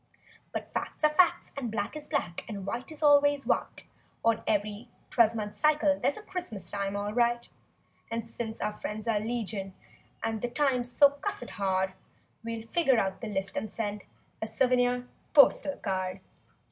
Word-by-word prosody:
But - - -5
facts - - -4
are 305 0 +5
facts, 360 +3 +3
and 265 -4 -3
black 220 +3 -3
is 305 - -4
black. 175 - -2
And 200 -3 -5
white 240 +8 -4
is 310 0 -7
always 290 -1 +5
white— - - -1 0.4
On 230 -1 +3
ev'ry 210 +3 -1 0.2
twelve 230 -1 +4
month 210 -2 -4
cycle 300 -1 +3
there's 285 - +1
A 430 - -9
Christmas 290 - -5
time 200 -1 -2
all 205 +1 -2
right; 240 0 +2 0.6
And 230 0 -3
since 225 -1 -5
our 210 - 0
friends 210 +1 -5
are 220 -2 +2
legion 210 -4 -3 0.5
and 225 -1 -1
The 245 - -1
times 250 -2 +1
so 285 +2 +7
cussed 285 -4 -4
hard— 190 -1 0 0.5
We'll 230 -1 -4
figure 275 -6 +3
out 190 -3 0
the 230 - -4
list 195 -1 -2
and 215 - -3
send— 210 -2 -3 0.4
A 220 - -1
souvenir 245 +1 +2 0.3
postal 285 0 +6
card. 185 -1 -2
230 Hz, 170 wpm, -29 LUFS, 205-275 Hz, 0.6 s, so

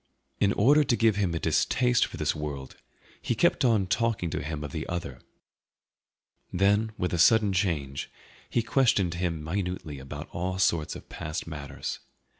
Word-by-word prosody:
In 100 - +3
order 145 +8 +5
to 140 -4 +2
give 115 -3 +3
him 95 -5 0
a - - -1
distaste 125 +6 +2
for - - -9
this - - 0
world 70 -3 -6 0.5
he - - -1
kept - - +2
on 115 -6 +3
talking 105 -3 0
to - - -2
him 75 0 -4
of 70 - -6
the 80 +2 -4
other. 85 0 -4 1.3
Then, 105 +4 +2
with 90 - -1
a 85 - 0
sudden 105 +2 +5
change, 80 -8 -1 0.4
he 120 - +1
questioned 115 -7 +2
him 85 -3 -2
minutely 90 -4 -3
about 65 0 -7
all 90 +2 -3
sorts 85 -5 +1
of - - -11
past 75 +1 -5
matters. 70 -4 -6
90 Hz, 165 wpm, -27 LUFS, 75-110 Hz, 1.3 s, order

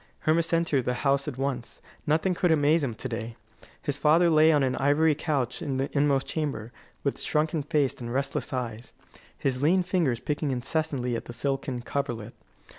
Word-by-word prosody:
Hermas 160 +1 +2
entered 165 -6 +1
the 125 - 0
house 140 +1 +2
at 135 -4 -4
once; 130 -3 -3 0.3
nothing 160 +5 +2
could 175 0 +1
amaze 155 +1 +3
him 120 -5 -2
to 130 - -5
day. 115 -1 -5 0.5
His 145 0 -2
father 165 +4 +4
lay 155 +1 +6
on 145 -3 +3
an 130 -1 +1
ivory 145 +3 +3
couch 140 -5 -2
in 135 -3 -2
the 135 +3 -3
inmost 140 -2 +2
chamber, 140 -8 -3 0.3
with 140 - -1
shrunken 155 +1 0
face 145 -1 +1
and 120 0 -5
restless 135 +2 -1
eyes, 120 -3 -4 0.4
his 130 -2 -1
lean 180 +5 +4
fingers 170 -10 +1
picking 150 0 -2
incessantly 130 -1 -1
at - - -5
the 120 - -7
silken 135 0 -2
coverlet. 120 -5 -3
140 Hz, 180 wpm, -27 LUFS, 125-155 Hz, 0.5 s, lay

